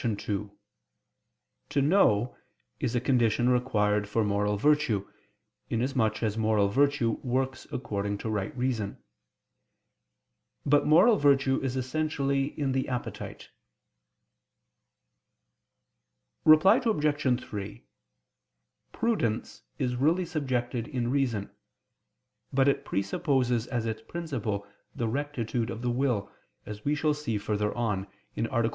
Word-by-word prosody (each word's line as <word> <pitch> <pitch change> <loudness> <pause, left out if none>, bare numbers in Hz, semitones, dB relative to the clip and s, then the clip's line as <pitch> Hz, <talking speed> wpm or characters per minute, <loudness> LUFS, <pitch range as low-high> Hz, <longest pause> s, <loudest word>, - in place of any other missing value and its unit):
2: 105 -2 -2 1.2
"To 140 - +1
know" 135 - +3 0.4
is 120 - -1
a - - +3
condition 120 -2 +2
required 105 -5 +1
for 110 +1 +1
moral 105 0 0
virtue, 145 -6 +2 0.6
inasmuch 115 -2 0
as 110 0 0
moral 110 -2 +2
virtue 135 -1 +2
works 130 +1 -2
according 100 -5 -2
to 105 - -6
right 105 +2 -3
reason. 120 -5 -1 1.7
But 145 +1 +3
moral 185 +9 +6
virtue 140 -3 +3
is 130 -1 -2
essentially 140 +1 -1
in 140 -2 0
the 130 0 -1
appetite. 125 -2 -5 3.0
Reply 175 - +7
Obj. 150 - +1
3: 95 - -7 1.1
Prudence 205 - -1 0.2
is 125 -4 -1
really 165 +7 +2
subjected 130 -7 -2
in 120 -2 -2
reason: 125 -8 0 1.0
but 135 0 +3
it 140 - +1
presupposes 125 - 0
as 120 -3 -2
its 110 -1 -3
principle 115 -9 -4 0.3
the 115 - -1
rectitude 125 -3 -2
of 115 +1 -6
the 120 - +1
will, 120 -5 0 0.3
as 105 0 -8
we 145 +1 +1
shall 150 +1 +1
see 145 -7 -2
further 105 0 -1
on 105 -5 -1 0.3
(A. - - -3
3; 115 -2 +1
Q. - - -1
125 Hz, 115 wpm, -28 LUFS, 110-140 Hz, 3.0 s, Reply